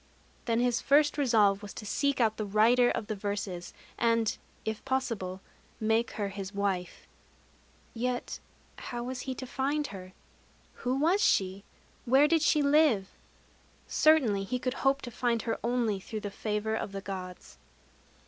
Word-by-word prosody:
Then 230 -1 +1
his 245 -1 +1
first 295 +1 +4
resolve 215 -8 +3
was 205 -2 -9
to 210 - -7
seek 280 +7 0
out 220 -2 +2
the 215 - -2
writer 225 +4 +4
of - - -2
the 215 - -3
verses, 200 -3 -4 0.3
and, 230 -2 +2 0.3
if 220 -1 -3
possible, 215 -8 -2 0.4
make 225 +1 +1
her 205 -2 -2
his 195 0 -7
wife.... 195 -3 -2 0.9
Yet 245 +1 -3 0.4
how 240 -1 -5
was 250 +1 -4
he 260 - -2
to 260 - -6
find 280 +4 -1
her? 185 -1 -9 0.6
Who 250 +1 -2
was 340 +8 +3
she? 190 +1 +2 0.4
Where 265 +4 +5
did 325 0 +3
she 300 -1 +3
live? 280 -9 +3 0.8
Certainly 245 -11 +3
he 250 +5 -2
could 255 0 -2
hope 270 +1 +2
to 245 - -6
find 235 -1 0
her 225 - -2
only 235 -4 0
through 215 +3 -6
the 205 - -5
favor 210 +1 -2
of 210 -2 -3
the 195 - -4
Gods. 185 -2 -8
225 Hz, 160 wpm, -29 LUFS, 200-260 Hz, 0.9 s, Where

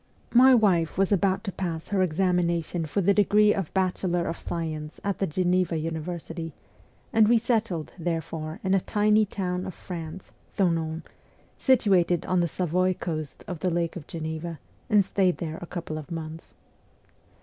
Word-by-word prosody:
My 255 +2 +8
wife 180 -9 +2
was 195 +1 +2
about 195 0 +2
to 200 - -3
pass 170 -4 -4
her 200 -2 +1
examination 170 -2 +1
for 200 +7 0
the 200 +2 +4
degree 210 +1 +4
of 190 -6 -3
Bachelor 185 -2 0
of 165 - -3
Science 155 -2 -4
at 200 -2 -2
the 195 - +1
Geneva 180 +1 +1
Uni 160 +1 -2
versity, 165 -1 -6 0.6
and 220 -1 +6
we 235 +1 +5
settled, 220 -8 -1
therefore, 160 -1 -3
in 190 0 +1
a 195 - +3
tiny 210 +1 +3
town 180 -2 -2
of 185 - -7
France, 170 0 -7 0.3
Thonon, 165 -4 0 0.6
situated 190 - +3
on 185 -1 +1
the 170 - +2
Savoy 185 +2 0
coast 155 -5 -5
of 180 -3 -5
the 180 - 0
Lake 170 -1 -1
of 170 -5 -8
Geneva, 160 0 -5 0.3
and 205 -2 +5
stayed 185 -2 +1
there 160 -1 -5
a 175 - -7
couple 165 -3 -5
of 155 - -10
months. 165 -1 -7
175 Hz, 165 wpm, -26 LUFS, 165-195 Hz, 0.6 s, My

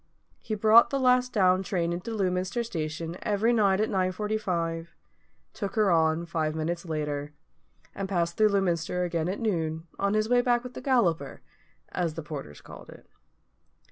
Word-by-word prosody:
He 215 - -4
brought 220 +3 +6
the 275 - -1
last 250 -1 +3
down 185 -4 +3
train 175 -3 -1
into 175 +6 -5
Lewminster 190 +2 -1
station 165 -4 -4
every 215 +3 +1
night 200 -4 +3
at 215 - +2
9.45, 185 -4 -1 0.7
took 200 -2 -5
her 210 -4 +3
on 160 0 +2
five 160 -2 -2
minutes 170 +3 -3
later, 150 -2 -3 0.6
and 195 -1 -4
passed 170 -3 0
through 215 -1 +4
Lewminster 180 -3 0
again 170 -1 -1
at 195 - -3
noon, 160 -7 -2
on 200 +1 +1
his 215 0 +1
way 245 +1 +4
back 245 -1 +1
with 250 0 -8
the - - -7
Galloper, 180 - +1 0.5
as 170 -4 -2
the 165 - -5
porters 140 - -8
called - - -12
it. - - -14
185 Hz, 165 wpm, -27 LUFS, 165-215 Hz, 0.7 s, brought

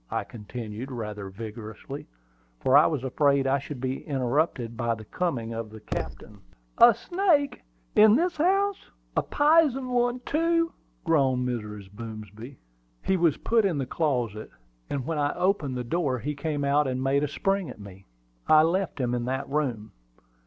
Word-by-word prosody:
I - - -1
continued, 115 +2 -7
rather 105 -5 -5
vigorously, 110 +6 -8 0.5
for 130 - +3
I 145 - +8
was 145 -5 -2
afraid 140 +1 +2
I 135 +1 +2
should 140 0 -7
be 130 +1 -3
interrupted 130 -3 0
by 115 0 0
the 110 -1 -11
coming 120 - -2
of 115 -1 -5
the 110 0 -11
captain. - - -6 0.4
"A 235 -2 +8
snake 345 -6 +1 0.3
in 215 0 +7
this 350 +5 +1
house! 390 +5 +1 0.3
a - - +3
pizen 290 -4 +3
one, 245 0 +1
too!" 330 +3 +1 0.3
groaned 135 -6 +2
Mrs. 105 -5 -5
Boomsby. 110 +3 -9 0.5
"He 190 - +2
was 170 -5 +2
put 230 -1 +2
in 185 -6 +1
the 135 - -1
closet; 125 -7 -1 0.4
and 135 -3 -3
when 160 0 -2
I 145 0 0
opened 170 -9 0
the 125 - -2
door 140 0 0
he 145 +6 -3
came 145 0 -2
out 145 +1 +3
and 130 0 -2
made 140 +2 +2
a - - +1
spring 195 +3 -1
at 125 - -10
me. 95 -1 -12 0.4
I 155 0 +7
left 170 -1 0
him 125 -2 0
in 120 -1 -1
that 130 +2 -2
room." 125 -8 -2
140 Hz, 165 wpm, -27 LUFS, 115-180 Hz, 0.5 s, I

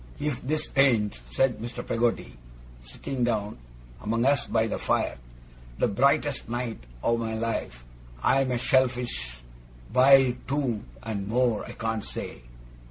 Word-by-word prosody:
'If 145 -3 -2
this 155 +3 -2
ain't,' 115 - +3
said 125 - +1
Mr. 120 +2 -6
Peggotty, 115 - 0 0.5
sitting 120 - -4
down 110 - -1 0.4
among 115 +3 0
us 140 -2 +3
by 110 -1 +2
the 115 - -3
fire, - - 0 0.6
'the - - +2
brightest 140 +4 +2
night 120 -1 -3 0.2
o' 115 - +2
my 110 -1 -2
life, 110 - -3 0.4
I'm 135 -1 +3
a 125 - +1
shellfish 125 - 0 0.5
biled 130 -1 +6
too 130 -6 -1 0.2
and 100 -3 -3
more 120 -1 +1
I - - -8
can't 115 -1 -2
say. - - -6
120 Hz, 135 wpm, -27 LUFS, 110-130 Hz, 0.6 s, biled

